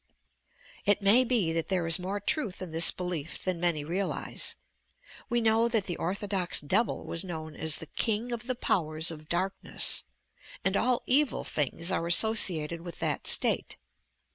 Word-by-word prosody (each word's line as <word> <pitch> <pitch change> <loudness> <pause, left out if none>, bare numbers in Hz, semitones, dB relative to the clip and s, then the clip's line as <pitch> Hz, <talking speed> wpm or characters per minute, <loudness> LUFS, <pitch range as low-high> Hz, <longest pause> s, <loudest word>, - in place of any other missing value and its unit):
It 205 0 +2
may 220 +6 +6
be 225 -10 0
that 165 -1 -2
there 185 -3 -1
is 165 +2 +3
more 190 +3 -3
truth 205 - -2
in 185 -3 -5
this 165 +1 +7
belief 175 -4 -5
than 185 -2 -1
many 170 -4 +1
realize. 185 +6 -2 0.7
We 240 -1 +1
know 225 +1 +3
that 225 -3 0
the 175 -3 -4
orthodox 195 0 -1
devil 195 +11 -1
was 165 - -1
known 160 -4 -7
as 160 -1 0
"The - - -4
King 225 +8 -1
of 240 0 -5
the 255 - -1
Powers 160 -7 -1
of 155 -1 -11
Darkness." 185 +3 -1 0.6
and 190 +1 +1
all 250 +3 +1
evil 280 +2 +2
things 165 +5 -1
are 170 - -1
a.ssociated 170 -5 +3
with 170 0 -9
that - - -2
state. - - +3
185 Hz, 165 wpm, -28 LUFS, 165-220 Hz, 0.7 s, this